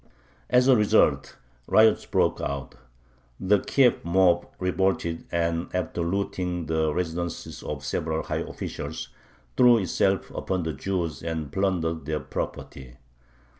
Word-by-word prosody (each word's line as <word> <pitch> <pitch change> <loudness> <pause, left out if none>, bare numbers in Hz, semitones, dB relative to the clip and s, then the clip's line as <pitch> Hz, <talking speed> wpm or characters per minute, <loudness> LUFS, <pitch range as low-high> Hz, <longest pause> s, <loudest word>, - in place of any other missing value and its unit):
As 125 +1 +4
a 130 - +7
result, 105 -3 +2 0.3
riots 110 0 +4
broke - - +1
out. 70 0 -4 0.7
The 100 +2 +3
Kiev 130 +2 +2
mob 85 0 +3
revolted, 90 -2 -1
and, 85 0 -1
after 90 -1 -2
looting 90 -1 -2
the 80 0 0
residences 85 0 -4
of - - -6
several 80 0 -2
high - - -3
officials, - - -6 0.5
threw 120 -1 +6
itself 95 -1 0
upon 95 -2 -2
the 80 -1 -2
Jews 85 0 -3
and 80 -3 -4
plundered 85 -4 -1
their 75 -1 -1
property. 65 -4 -6
85 Hz, 125 wpm, -26 LUFS, 80-95 Hz, 0.7 s, a